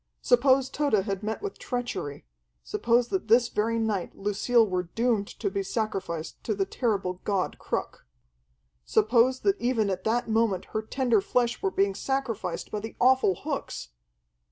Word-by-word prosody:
Suppose 260 +2 +4
Tode 270 -10 +1
had 195 -2 -2
met 220 - -4
with 410 - -5
treachery; 240 - -4 0.4
suppose 235 - +1
that 380 - -2
this 235 +2 +5
very 225 +2 0
night 215 -5 -1
Lucille 220 +4 +2
were 185 -2 0
doomed 225 -4 +1
to 200 -4 -4
be 200 0 -1
sacrificed 190 -6 -3
to 215 - -1
the 195 -1 0
terrible 195 -5 -1
god 195 -3 -1
Cruk! - - -4 0.8
Suppose 235 - +3
that 395 0 +1
even 230 -5 +1
at 185 0 -3
that 240 +2 0
moment 220 -4 +1
her 215 - 0
tender 235 -1 +1
flesh 240 +3 0
were 195 - +1
being 195 +1 +1
sacrificed 230 -6 -3
by 210 - -2
the 220 +2 -7
awful 255 -6 +4
hooks! - - -4
220 Hz, 155 wpm, -27 LUFS, 195-245 Hz, 0.8 s, this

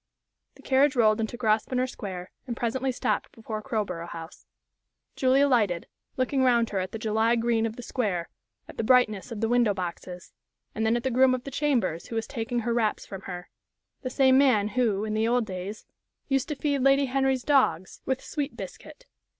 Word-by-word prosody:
The - - -18
carriage 270 +1 +3
rolled 220 -2 +4
into 225 +2 -3
Grosvenor 240 +2 +1
Square, 190 -7 -7 0.2
and 235 -2 -4
presently 260 +3 -1
stopped 250 - -1
before 220 -1 -6
Crowborough 190 -7 -3
House. 165 0 -10 0.7
Julie 260 +1 +3
alighted, 220 -11 +2 0.3
looked 255 +1 0
round 245 -4 +3
her 195 - 0
at 185 0 -3
the - - -4
July 220 +1 +2
green 230 -1 +1
of 220 - -7
the 245 - -8
square, 200 -10 -2 0.4
at - - -12
the - - -1
brightness 220 -5 +3
of 220 -2 -5
the 225 - +2
window 235 -3 +3
boxes, 180 -1 -6 0.4
and 220 0 0
then 230 +2 +3
at 240 - -5
the 265 - 0
groom 255 +1 +4
of 250 - -6
the 275 - -7
chambers 240 - 0
who 230 - -6
was 225 - -1
taking 240 -1 -3
her 235 +1 -1
wraps 225 -3 0
from 195 -1 -8
her 180 -1 -7 0.5
the 255 - -3
same 260 0 +4
man 220 -7 +4
who, 215 -3 +1
in 215 - -3
the 220 +1 +1
old 240 0 +2
days, 190 +2 -6 0.4
used 270 -2 +1
to 300 - -3
feed 285 0 0
Lady 275 +1 +4
Henry's 265 -1 +1
dogs 190 - +1
with 265 -1 -2
sweet 295 -2 -4
biscuit. - - -10
230 Hz, 195 wpm, -27 LUFS, 210-260 Hz, 0.7 s, rolled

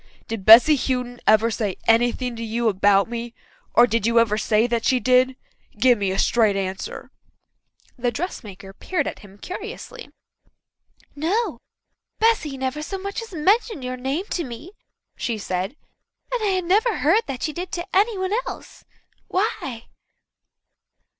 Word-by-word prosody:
Did 225 -4 -5
Bessy 240 +7 +9
Houghton 250 -2 -2
ever 220 +2 +4
say 210 -4 -2
anything 240 +2 +2
to 230 - -6
you 230 +1 -1
about 200 0 +3
me 235 0 -6 0.4
or 240 - +8
did 230 -2 0
you 235 0 +2
ever 230 -2 +4
say 215 +1 +2
that 235 -1 -1
she 255 - +2
did? 255 +2 +3 0.4
Give 245 +3 +5
me 200 -3 -1
a 190 - -2
straight 220 -1 +3
answer." 190 -1 -5 0.9
The 245 0 +1
dressmaker 215 - -6
peered 310 - -2
at - - -5
him 200 -1 -15
curiously. 420 - -8 1.1
"No. 340 - -1 0.6
Bessy 425 -12 +1
never 265 +3 -3
so 385 +6 -5
much 395 +3 -5
as 455 - -10
mentioned 390 - +1
your 255 0 -3
name 270 +8 -3
to 345 - -1
me," 255 +6 -9 0.5
she 230 -2 -2
said, 190 +3 -3 0.6
"and - - 0
I 390 -3 +1
never 415 +6 +2
heard 345 +10 +3
that 265 -3 -5
she 310 - -2
did 355 +2 -6
to 345 0 -3
anyone 395 -1 +1
else. - - -9 0.4
Why?" 275 - -2
250 Hz, 150 wpm, -22 LUFS, 225-360 Hz, 1.1 s, Bessy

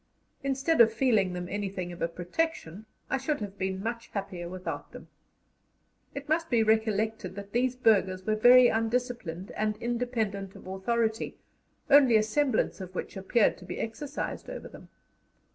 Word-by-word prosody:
Instead 275 +2 +2
of 225 -1 +7
feeling 220 -6 +2
them 180 0 -4
anything 195 -2 -4
of 175 - -10
a - - +2
protection, 180 - -3 0.2
I 270 - 0
should 290 +2 -1
have 200 -2 -7
been 190 0 -2
much 230 +1 -4
happier 190 -4 -5
without 185 0 -6
them. - - -11 1.1
It 280 +1 -6
must 325 +2 0
be 235 -3 +3
recollected 220 -3 0
that 200 0 -8
these 250 +2 +1
burghers 195 -6 +2
were 215 - +1
very 245 +3 +8
undisciplined 225 -6 -2
and 215 0 -1
independent 225 -5 -2
of - - -13
authority, 220 +4 -1 0.5
only 270 -5 +6
a 215 - +3
semblance 240 -2 0
of 185 0 -8
which - - -5
appeared 200 +4 +2
to 180 - -12
be 180 - -6
exercised 270 +6 -4
over - - -7
them. - - -14
220 Hz, 160 wpm, -29 LUFS, 190-245 Hz, 1.1 s, very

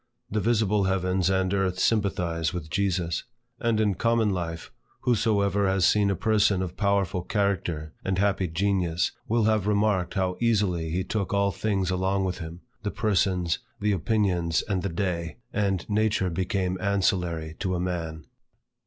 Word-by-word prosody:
The 105 - +1
visible 105 -2 +2
heavens 95 -1 +1
and 95 0 +1
earth 95 -2 0
sympathize 90 -6 0
with 80 -3 -6
Jesus. 90 -4 0 0.4
And 115 -2 +1
in 105 -2 +2
common 115 +2 +2
life, 85 -3 -4 0.3
whosoever 100 -4 +2
has 95 -2 +2
seen 105 0 +4
a 100 - +1
person 105 -1 +2
of 90 -1 -5
powerful 100 -3 +1
character 90 -6 -1
and 95 -1 -1
happy 95 -1 +1
genius, 85 -1 0 0.2
will 115 0 +2
have 105 -2 +2
remarked 105 -3 +1
how 95 -2 0
easily 100 -8 +1
he 90 +4 -1
took 100 0 -2
all 100 0 +2
things 95 -3 -1
along 95 +1 0
with 90 -1 -3
him, 85 +1 -8 0.2
the 105 - -2
persons, 95 -6 +1 0.2
the 105 0 +1
opinions, 90 -3 +1
and 95 -3 -1
the 100 - -2
day, 85 -3 -2 0.2
and 100 -4 0
nature 105 -3 +1
became 95 +1 -1
ancillary 90 -5 0
to 95 -2 -1
a - - -1
man. 85 -4 -3
95 Hz, 155 wpm, -26 LUFS, 90-100 Hz, 0.4 s, seen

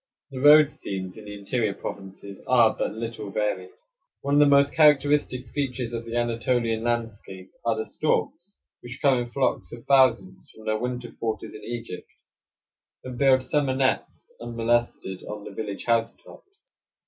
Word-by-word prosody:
The 130 - -6
road 150 +1 +7
scenes 95 -7 -5
in 110 - -11
the 105 0 -8
interior 105 0 -1
provinces 95 0 -9
are 120 -3 +4
but - - -2
little 110 -2 -5
varied. 100 -3 -2 0.5
One 140 - -2
of 145 - +5
the 145 - +6
most 140 0 +4
characteristic 145 -4 +3
features 125 -4 -3
of 115 0 -4
the 115 0 -6
Anatolian 115 -1 0
landscape 115 -5 -4
are 115 -1 +1
the 110 - -2
storks, 175 +5 -2 0.2
which 120 +1 -9
come 135 -3 +3
in 120 0 -4
flocks 135 +1 -1
of 120 0 -10
thousands 130 -9 +2
from 110 - -14
their 110 0 0
winter 125 0 -4
quarters 110 -1 -4
in 110 - -10
Egypt 115 -6 -7 0.9
and 125 -1 -7
build 130 -2 +4
summer 135 0 0
nests, 130 -1 -1
unmolested, 120 -4 -1
on 105 -1 -7
the - - -9
village 105 -3 -6
housetops. 115 - -3
120 Hz, 160 wpm, -25 LUFS, 110-130 Hz, 0.9 s, road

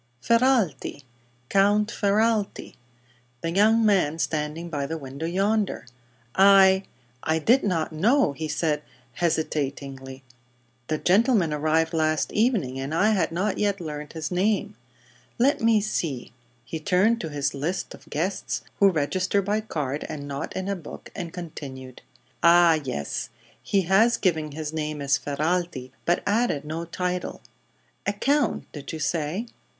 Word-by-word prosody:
"Ferralti 230 - +1 0.4
Count 205 - +3
Ferralti. 215 0 0 0.7
The 165 - -2
young 220 +5 +4
man 180 -7 +3
standing 155 +1 -2
by 145 -4 -3
the 165 - -3
window, 140 +2 -6
yonder." 200 +2 0 0.5
"I 195 0 +6 0.4
I 160 0 +1
did 240 - +4
not 170 -6 0
know," 215 - +3
he 155 +3 -4
said, 150 -1 0 0.3
hesitatingly. 140 -4 -2 0.6
"The 155 - 0
gentleman 195 - +3
arrived 160 +2 +1
last 155 -1 +1
evening, 210 - +1
and 135 +4 -3
I 210 +6 +4
had 185 -7 +1
not 190 +4 -1
yet 200 -1 +1
learned 150 -3 -6
his 160 0 -4
name. 205 +3 0 0.6
Let 275 +4 +2
me 225 -1 +4
see," 165 - -3 0.3
he 160 - -5
turned 195 +8 +2
to 160 - -4
his 145 -1 -1
list 160 +7 -3
of - - -15
guests, 175 +7 -2 0.2
who 200 - +7
register 185 +4 0
by 210 +3 0
card 150 -9 -3
and 145 -1 -6
not 140 +1 -5
in 190 0 -3
a 200 - 0
book, 175 - -10
and 170 -3 -5
continued: 135 -7 -8 0.4
"Ah, 170 -1 +6
yes; 75 - -3 0.3
he 200 - +1
has 195 +7 +4
given 155 -5 0
his 155 0 -5
name 155 -1 -3
as 140 0 +1
Ferralti, 150 -2 -2
but 175 - +1
added 205 -9 +1
no 160 +2 -4
title. 180 +1 -3 0.7
A 200 - +2
count, 285 +8 +1
did 145 -2 -7
you 160 - -5
say?" 155 +6 -1
170 Hz, 145 wpm, -25 LUFS, 150-200 Hz, 0.7 s, who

